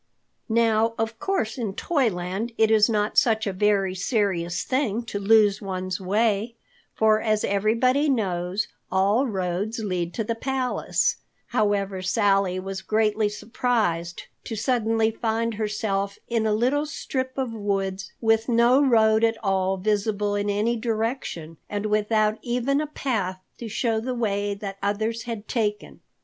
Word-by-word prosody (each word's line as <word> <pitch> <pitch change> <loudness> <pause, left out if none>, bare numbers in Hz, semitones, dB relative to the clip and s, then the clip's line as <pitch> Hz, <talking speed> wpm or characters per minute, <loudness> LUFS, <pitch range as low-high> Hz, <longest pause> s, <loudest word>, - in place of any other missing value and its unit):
Now, 225 0 +2
of 225 0 -2
course 265 - -1
in 210 -5 -3
Toyland 220 - -1
it 220 0 +4
is 215 0 +5
not 210 -1 +2
such 220 -2 +1
a 200 - -2
very 195 -1 +2
serious 185 -3 -1
thing 245 -4 0
to 215 -3 -4
lose 205 0 +4
one's 185 -1 -4
way, 215 +3 0 0.4
for 220 0 +3
as 215 -2 +1
everybody 235 +8 +2
knows, 190 -4 -1 0.2
all 205 +8 +2
roads 190 +1 -2
lead 180 -6 -2
to 225 - -1
the 230 - -1
palace. 255 +2 0 0.3
However, 200 -4 0
Sally 195 -1 +2
was 190 0 -5
greatly 215 0 +1
surprised 210 -6 -1 0.2
to 225 - -4
suddenly 225 -1 +1
find 225 +1 -1
herself 210 -2 -2
in 230 -2 0
a - - +1
little 255 +8 +1
strip 260 -3 -4
of 260 -4 -2
woods, 195 -2 -2
with 225 +1 +2
no 240 +4 +4
road 220 -4 +4
at 225 0 +2
all 190 -1 +1
visible 205 +1 0
in 205 0 -1
any 210 +4 +1
direction, 220 - -3
and 205 0 -3
without 215 0 +1
even 250 +4 0
a 305 - -3
path 215 -11 -2 0.2
to 230 - -6
show 225 +1 0
the 250 +3 -3
way 205 -3 -1
that 195 -1 -7
others 220 +3 -1
had 225 -2 -5
taken. 210 -4 -2
215 Hz, 145 wpm, -24 LUFS, 200-230 Hz, 0.4 s, is